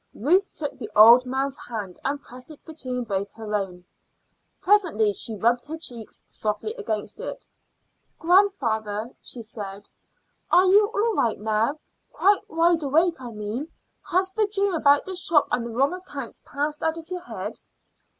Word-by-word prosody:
Ruth 360 - +2
took 290 -4 -4
the 225 - -6
old 235 +4 +8
man's 270 +2 -2
hand 205 -6 -6
and 280 +1 -1
pressed 250 +3 -10
it 310 - -13
between 255 -6 -5
both 200 -3 -3
her 220 -1 -7
own. 185 -3 -3 0.7
Presently 340 - +3
she 220 +3 -1
rubbed 240 +5 +1
her 320 +2 -5
cheeks 240 -8 -6
softly 215 - -3
against 310 - -4
it. - - -6 0.7
"Grandfather," 240 - +1
she 235 - -7
said, 205 -2 -7 0.6
"are 365 +1 +6
you 405 +3 +6
all 450 0 0
right 230 - 0
now 220 +6 0 0.3
quite 405 +1 +2
wide 330 +1 +3
awake, 315 +2 +2
I 245 - -6
mean? 215 +6 -5 0.4
Has 375 +1 +2
the 430 +1 +1
dream 400 -1 +1
about 285 -3 +4
the 380 - -5
shop 340 -4 +3
and 235 -1 0
the - - -7
wrong 270 +8 +1
accounts 290 -9 -8
passed 295 +1 -3
out 320 0 0
of 325 -1 -9
your 360 -1 -3
head?" 360 - -6
275 Hz, 160 wpm, -25 LUFS, 220-350 Hz, 0.7 s, old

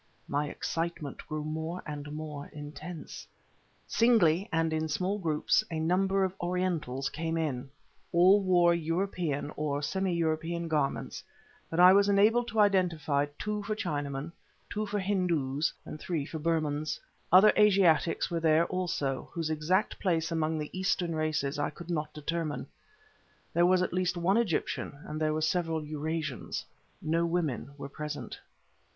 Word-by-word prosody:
My 145 +1 -1
excitement 165 -4 -3
grew 155 0 -3
more 160 +3 -4
and 145 -1 -6
more 150 -2 -6
intense. 150 +3 -8 0.6
Singly, 200 -7 +3
and 165 -1 +1
in 160 0 0
small 185 +6 -1
groups, 160 +4 +2
a 160 -2 -3
number 190 +4 +2
of 190 -1 0
Orientals 175 -7 -1
came 165 +3 -2
in. 140 -5 -2 0.4
All 185 +4 +6
wore 175 -2 +4
European, 165 -3 -1
or 145 -1 -2
semi 190 +4 0
European 165 0 -1
garments, 150 -4 -1 0.5
but 165 - -2
I 180 +1 +9
was 200 +1 +5
enabled 220 +4 +4
to 225 -2 -2
identify 165 -8 +2
two 210 0 -2
for 215 +1 -3
Chinamen, 145 -5 -3 0.4
two 215 +1 -2
for 205 - -2
Hindus 170 -8 0
and 155 - -7
three 160 -5 -2
for 160 +1 -6
Burmans. 155 -2 -1 0.3
Other 190 +4 +8
Asiatics 190 -6 +4
there 165 -2 +3
were, - - +2
also, 160 -8 -2
whose 165 -2 -2
exact 170 +7 0
place 165 -3 0
among 160 -1 0
the 150 +2 -5
Eastern 185 -2 0
races 155 -2 -1
I 145 - 0
could 170 +3 -9
not 150 -2 -2
determine; 155 0 -3 0.9
there 175 +1 +4
was 185 0 +4
at - - -2
least 180 -1 0
one 185 +5 +2
Egyptian 175 -8 -1
and 155 +1 -5
there 155 0 +2
were 155 +1 -1
several 160 -1 0
Eurasians; 155 -2 -3 0.4
no 165 +2 +1
women 155 -6 -1
were 140 - -6
present. 150 +1 -6
165 Hz, 150 wpm, -30 LUFS, 150-185 Hz, 0.9 s, I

